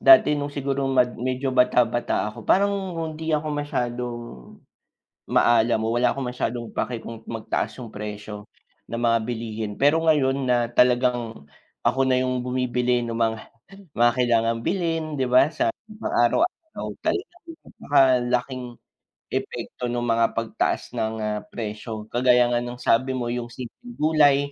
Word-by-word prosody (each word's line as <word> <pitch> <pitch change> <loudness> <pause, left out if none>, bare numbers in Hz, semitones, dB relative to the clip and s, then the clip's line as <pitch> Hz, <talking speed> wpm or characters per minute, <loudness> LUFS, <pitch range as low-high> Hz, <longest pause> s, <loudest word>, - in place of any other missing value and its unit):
dati 330 - +7
no'ng 145 0 -2
sigurong 135 -1 -1
mad 125 -1 +3
medyo 130 +2 -1
bata-bata 120 -4 +2
ako, - - -11
parang 200 +1 +4 0.2
hindi 160 -1 -2
ako 150 +1 -1
masyadong, 125 -4 -3 1.1
maalam 115 -1 +4
o 115 - 0
wala 125 +1 +3
akong 135 -2 -3
masyadong 120 -1 -3
pake 120 -2 -2
kung 115 -1 -8
magtaas 115 -1 -3
yung 115 -3 -8
presyo, 105 0 -7 0.4
ng 115 - -3
mga 115 -1 +3
bilihin. 110 -3 -4
Pero 145 +4 +4
ngayon 140 -4 +2
na 120 -1 +2
talagang, 120 - +2 0.4
ako 135 - +3
na 130 -1 +3
yung 130 0 -1
bumibili 125 -1 0
no'ng 115 -1 -4
mga 115 -1 +1 0.6
mga 120 0 +5
kailangang 115 -2 +2
bilhin, 165 -4 0
di 130 - +2
ba? 130 +3 +5
Sa 335 - 0 0.2
pang-araw-araw, 315 - -1 0.2
talagang 355 -3 -3 0.2
napaka 140 -1 +2 0.3
laking, 125 +1 -1 0.7
epekto 125 - -4
no'ng 120 0 -2
mga 115 0 +3
pagtaas 115 -1 -1
ng, 110 0 -1
ah, 105 -1 -2
presyo. 110 0 -6
Kagaya 125 0 +4
nga 120 - +1
ng 120 0 -6
sabi 130 +2 +1
mo 120 -1 -2
yung 120 -1 -4
simpleng 130 - -10
gulay, 150 -2 +4
125 Hz, 145 wpm, -24 LUFS, 115-140 Hz, 1.1 s, dati